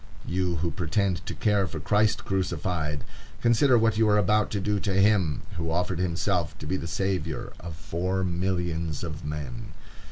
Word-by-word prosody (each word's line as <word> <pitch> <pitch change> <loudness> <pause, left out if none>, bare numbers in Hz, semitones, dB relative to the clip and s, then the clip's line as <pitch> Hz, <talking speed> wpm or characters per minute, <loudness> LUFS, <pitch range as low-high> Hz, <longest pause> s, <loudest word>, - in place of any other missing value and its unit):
You 90 -1 0
who 85 +1 -1
pretend 90 +1 0
to - - -3
care 100 -3 +2
for 80 - -5
Christ 105 +6 +2
crucified, 85 -5 -1 0.4
consider 120 +2 +4
what 115 -1 +2
you 110 -1 +4
are 105 - +4
about 105 +1 +3
to 105 - -1
do 105 +1 0
to 100 0 -1
him 95 -7 +3
who 80 0 -2
offered 90 +1 0
himself 90 -2 0
to - - -8
be 85 - -1
the 85 - -3
savior 90 -3 -2
of 85 -2 -7
four 90 +4 -2
millions 85 -3 -1
of 80 -3 -5
men. 75 -5 -5
90 Hz, 170 wpm, -27 LUFS, 80-100 Hz, 0.4 s, consider